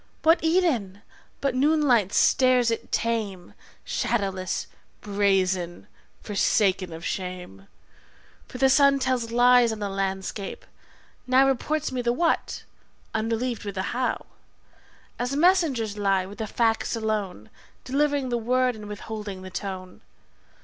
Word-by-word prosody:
What 325 +2 +5
Eden 275 - +1 0.4
but 275 -2 0
noon 295 +5 +3
light 235 -9 +3
stares 255 -2 +4
it 230 - -4
tame, 210 -6 -2 0.3
Shadowless, 195 -5 -2 0.3
brazen, 190 -4 0 0.4
forsaken 195 -3 +1
of 165 +1 -8
shame? 180 - -5 0.8
For - - -9
the 265 +1 +4
sun 275 +1 +5
tells 255 -3 -1
lies 245 0 +5
on 220 - -4
the 205 -1 -3
landscape, 195 +1 -4 0.6
now 260 +1 +5
Reports 270 +3 0
me 255 -1 -2
the 240 0 0
`what', 335 +2 0 0.5
unrelieved 230 +2 -2
with 200 -1 -6
the 190 - -3
`how', 250 +1 -1 0.9
As 250 +3 -1
messengers 290 - +2
lie, 195 -2 +1
with 200 +4 -11
the 220 - -3
facts 225 +1 0
alone, 210 - -3 0.3
Delivering 285 0 0
the 240 -1 0
word 250 +1 +1
and 210 -1 -9
withholding 210 -2 -7
the 185 - -9
tone. 185 -1 -6
225 Hz, 130 wpm, -25 LUFS, 195-255 Hz, 0.9 s, What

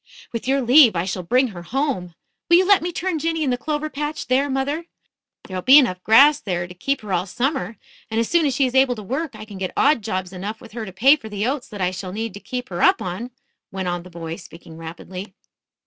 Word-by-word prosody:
"With 230 +1 -4
your 275 +1 +2
leave, 245 -3 +7
I 170 +1 0
shall 185 -1 -3
bring 250 +8 +2
her 180 -5 -9
home. 190 - -2 0.3
Will 340 - +7
you 370 - +4
let 405 -1 +6
me 350 +2 -3
turn 355 -1 -2
Jinny 325 0 -1
in 270 - 0
the - - +2
clover 300 +4 -2
patch 300 +1 -4
there, 270 +3 +2
mother? 280 +5 -2 0.6
There'll 185 -2 -5
be 265 +8 +8
enough 185 -10 +3
grass 280 +7 +6
there 175 -3 -3
to 180 - -11
keep 275 +10 -2
her 205 -3 -5
all 180 +2 0
summer, 240 - -2 0.3
and 225 0 -1
as 230 - +1
soon 340 -3 +3
as 270 - -1
she 270 - +3
is 250 - -2
able 265 -1 +4
to 215 - -8
work 265 - -3
I 215 0 -9
can 205 -3 -10
get 185 -1 -3
odd 285 -4 +4
jobs 185 -3 -4
enough 205 +4 -5
with 230 - -14
her 220 -1 -6
to - - -7
pay 265 +11 +5
for 220 -6 -10
the 205 0 -2
oats 260 0 -2
that 205 -2 -8
I 180 0 +1
shall 185 0 -6
need 225 +2 -4
to 200 - -9
keep 250 +3 -6
her 175 -1 -4
up - - +5
on," 185 +7 -5 0.4
went 190 -1 -4
on 175 0 -2
the 180 - -13
boy 165 -1 -6
speaking 165 -2 -13
rapidly. 180 +4 -9
225 Hz, 255 wpm, -22 LUFS, 185-275 Hz, 0.6 s, be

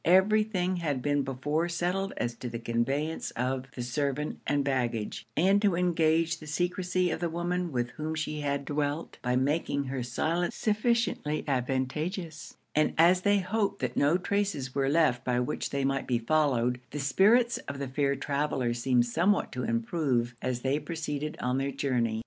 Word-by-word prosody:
Every 190 +5 +5
thing 185 -4 -1
had 145 -7 -2
been 145 0 +2
before 145 +5 -1
settled 180 +3 -1
as 120 - -1
to 125 - -5
the 115 - -4
conveyance 135 +7 -1
of 130 +2 -1
the 125 - -3
servant 140 +3 -2
and 145 -1 +2
baggage, 120 -5 -2
and 195 +4 +4
to 200 -4 +3
engage 165 -1 +2
the 155 - -11
secresy 180 +2 0
of - - -2
the 170 0 -1
woman 175 +1 -2
with 120 -2 -1
whom 155 +1 -4
she 155 -1 -3
had 140 -1 -1
dwelt, 145 +2 -2
by 125 0 0
making 140 +2 +1
her 130 -1 -3
silence 160 +8 -1
sufficiently 215 -8 0
advantageous; 150 +6 -2 0.2
and 155 0 +2
as 175 +3 +5
they 205 +1 +4
hoped 200 +1 0
that - - -2
no 145 +5 +3
traces 190 -9 -1
were 135 -1 +1
left 150 -5 +3
by 125 -1 +1
which 125 +5 -2
they 140 -1 -1
might 135 0 -1
be 125 - +2
followed, 125 -2 +1
the 150 - -5
spirits 215 - +4
of 140 - -4
the 140 0 -3
fair 140 +1 0
travellers 135 -4 -1
seemed 125 -1 +3
somewhat 175 +12 +1
to 125 - -4
improve 120 0 0
as 125 -1 -2
they 135 +3 +1
proceeded 155 -2 -4
on 125 +1 0
their 135 +1 -1
journey. 125 -5 0
145 Hz, 175 wpm, -29 LUFS, 130-175 Hz, 0.2 s, Every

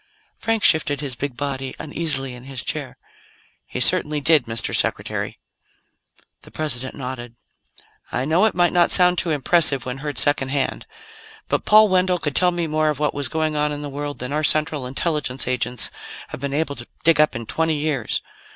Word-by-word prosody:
Frank 225 -1 0
shifted 155 -4 +4
his 140 -4 -4
big 135 -1 -5
body 135 -2 -3
uneasily 145 -4 -1
in 125 0 -11
his 135 -2 -5
chair. - - -4 0.7
"He - - -5
certainly 150 0 +2
did, 150 -2 +4
Mr. 115 0 -1
Secretary." - - -2 1.0
The - - -13
President 130 -5 -3
nodded. 125 -3 -6 0.8
"I 125 - -1
know 165 +8 +3
it 220 - +1
might 175 -1 +3
not 175 -1 +4
sound 180 -1 +4
too 170 - -1
impressive 145 -2 +1
when 130 +1 -5
heard 145 0 -5
second 145 -2 +2
hand, 135 -1 -1 0.6
but - - 0
Paul 215 0 +7
Wendell 185 -1 +2
could 150 -4 -3
tell 180 - +4
me 175 -1 -2
more 155 0 +1
of 150 - -1
what 150 0 0
was 140 -2 -1
going 155 -1 -1
on 150 0 +1
in 145 0 -5
the 145 - -5
world 145 +1 -5
than 125 +3 -5
our 155 +1 0
Central 150 -3 +2
Intelligence 135 -1 -1
agents 125 -1 0 0.4
have - - -7
been 140 -1 -3
able 145 0 -1
to 120 - -9 0.2
dig 160 -2 +5
up 155 - +2
in 115 0 -5
twenty 160 +6 0
years. 145 -6 -1
145 Hz, 190 wpm, -22 LUFS, 135-160 Hz, 1.0 s, Paul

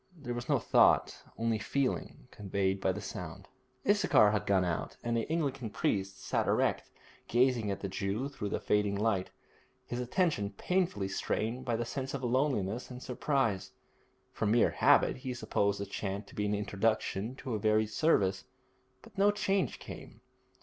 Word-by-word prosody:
There 125 -6 -5
was 120 0 -5
no - - +4
thought, - - +3 0.2
only 115 -1 0
feeling, 130 +4 -2
conveyed 95 -1 -1
by 95 - +2
the - - -5
sound. - - -7 0.4
Issachar 195 - +5
had 105 -3 -1
gone 95 -2 +3
out, 85 -2 -3
and 120 0 0
the 115 +3 -1
Anglican 140 -7 -1
priest 95 -1 -2
sat - - 0
erect, - - +1 0.4
gazing 120 -3 +2
at 100 - -3
the 100 - -2
Jew 100 +6 -2
through 135 -8 -5
the - - -1
fading 105 -1 +1
light, 100 -3 0 0.6
his 120 - -4
attention 125 - 0
painfully 175 - 0
strained 110 +5 -2
by 120 - 0
the 120 +1 -2
sense 135 +2 -4
of 135 - -5
loneliness 125 -4 0
and 125 0 -8
surprise. 115 -8 -1 0.6
From 110 - -1
mere 115 +2 +4
habit - - +4
he 130 -1 -5
supposed 100 -3 0
the 100 - -3
chant 100 +1 -4
to - - -15
be 105 0 0
an 105 - +1
introduction 105 +2 -1
to 130 -3 -5
a 110 - -1
varied 110 0 +2
service, 100 -12 +2 0.6
but 225 -3 -16
no 200 +1 +6
change 200 -1 0
came. - - -10
110 Hz, 170 wpm, -31 LUFS, 100-130 Hz, 0.6 s, no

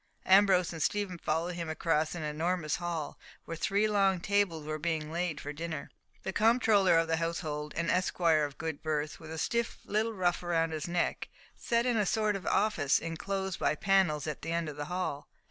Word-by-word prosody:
Ambrose 190 -2 +5
and 165 - -6
Stephen 195 0 -1
followed 165 +3 -1
him 170 -2 -4
across 155 0 0
an 165 - -4
enormous 155 +1 -1
hall, 170 -4 -4 0.3
where 165 - -5
three 200 +6 +1
long 195 -3 +2
tables 185 -5 0
were 155 0 -3
being 155 -1 -2
laid 170 -1 -2
for 145 - -6
dinner. 160 -2 -5 0.3
The 190 - -3
comptroller 215 -5 +4
of 165 0 +2
the 165 0 +1
household, 155 -3 -3
an 165 +1 -1
esquire 170 -3 +2
of 145 -1 -4
good 160 -2 -4
birth, 150 -1 -2
with 160 - -11
a 160 - -6
stiff 235 +8 -1
little 220 +2 0
ruff 180 -2 +1
round 165 -2 0
his 155 0 -3
neck, 175 0 -1 0.3
sat 235 0 0
in 245 -2 +2
a 210 -2 +2
sort 215 0 +1
of 190 -4 -6
office 200 -10 +2
inclosed 190 +3 -3
by - - +1
panels 180 -4 +2
at 155 -2 -4
the 165 - -4
end 170 -1 -1
of 150 - -7
the 145 0 -4
hall. 165 -4 -3
170 Hz, 195 wpm, -31 LUFS, 155-195 Hz, 0.3 s, Ambrose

